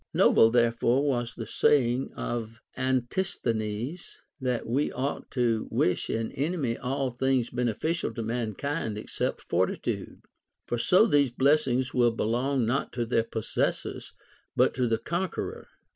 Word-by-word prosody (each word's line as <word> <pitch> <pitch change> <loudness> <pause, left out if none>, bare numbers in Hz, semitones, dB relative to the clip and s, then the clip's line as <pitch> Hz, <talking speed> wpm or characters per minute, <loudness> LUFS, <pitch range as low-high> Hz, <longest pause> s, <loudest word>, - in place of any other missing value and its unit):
Noble 115 - +6
therefore 120 +3 +2
was 120 -4 -1
the 115 - -5
say 120 +2 +3
ing 130 +2 -3
of 115 -1 -4 0.2
Antisthenes, 125 - -2 0.2
that 125 -3 -1
we 135 +6 0
ought 135 +3 -3
to 115 -4 0
wish 90 - +1
an 115 0 -2
enemy 140 -5 -1
all 135 +1 -2
things 130 0 0
beneficial 125 +7 -1
to 115 - -3
mankind 115 - -2
except 105 - -3
fortitude; 90 +2 -2 0.4
for 120 - -2
so 180 - +5
these 145 - +3
blessings 130 0 +2
will 120 -1 +4
belong 120 +3 0
not 125 +5 -1
to 120 -1 -1
their 115 -1 +2
possessors 110 -1 -3 0.4
but - - +3
to 125 -2 0
the 115 -1 +1
con 175 +9 -2
queror. - - -5
125 Hz, 140 wpm, -28 LUFS, 115-135 Hz, 0.4 s, Noble